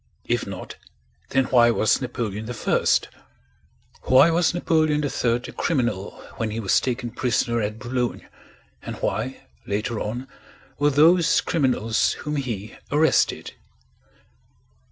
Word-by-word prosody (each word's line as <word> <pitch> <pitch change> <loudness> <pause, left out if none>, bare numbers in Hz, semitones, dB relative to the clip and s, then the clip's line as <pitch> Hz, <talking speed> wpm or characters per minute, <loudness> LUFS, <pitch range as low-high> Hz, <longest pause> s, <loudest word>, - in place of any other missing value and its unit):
If - - -1
not, - - -8 0.5
then 135 -1 +2
why 120 -2 +6
was 110 +1 +2
Napoleon 110 -3 -4
I? 120 - -1 1.1
Why 130 +6 +5
was 170 0 +2
Napoleon 155 -3 +1
III 125 -4 0
a 120 - -6
criminal 120 - -2 0.2
when 115 -1 -2
he 110 +2 -4
was 100 -4 +3
taken 120 -2 -3
prisoner 120 -1 0
at 105 +1 -3
Boulogne, 125 0 -3 0.6
and - - -6
why, - - -3 0.2
later 105 +2 -2
on, 120 +5 -4 0.5
were 145 0 +4
those 165 +4 +4
criminals 125 -8 +1
whom 150 0 -4
he 115 -6 -4 0.2
arrested? 155 +2 +2
125 Hz, 120 wpm, -23 LUFS, 115-145 Hz, 1.1 s, why